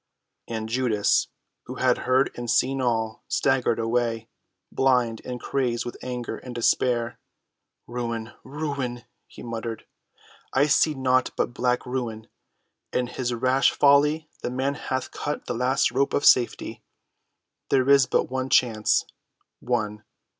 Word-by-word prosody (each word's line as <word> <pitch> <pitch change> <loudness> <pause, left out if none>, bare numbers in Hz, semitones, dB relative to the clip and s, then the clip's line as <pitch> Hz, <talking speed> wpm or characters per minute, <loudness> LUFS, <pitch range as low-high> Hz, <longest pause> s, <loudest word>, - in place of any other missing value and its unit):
And 110 -1 -4
Judas, 115 -3 +1 0.4
who - - -6
had - - +2
heard 130 +2 +3
and 120 -1 -5
seen 135 +4 +2
all, 110 -3 -1
staggered 130 -4 +1
away, 115 -1 -1 0.4
blind 125 -4 +2
and 125 -1 -5
crazed 120 -2 -1
with 120 - -6
anger 125 -1 -4
and 125 -2 -9
despair. 120 0 +1 0.7
"Ruin—ruin!" 120 +2 -5 0.2
he - - -12
muttered. 115 -1 -5 0.7
"I 140 +2 +4
see 150 +1 +3
naught 130 -1 +2
but - - 0
black 125 0 0
ruin! 120 -3 -4 0.6
In 125 - 0
his 125 0 -3
rash 130 +2 +3
folly 150 +2 +4
the - - -2
man 130 +3 -1
hath 130 -2 -4
cut 150 - -4
the - - -3
last 130 +2 +1
rope 135 +2 +1
of 145 - 0
safety. 120 -2 +3 0.9
There 130 -1 +3
is 140 -2 +6
but - - +2
one 130 0 -3
chance—one. 110 -1 -1
125 Hz, 130 wpm, -25 LUFS, 115-130 Hz, 0.9 s, is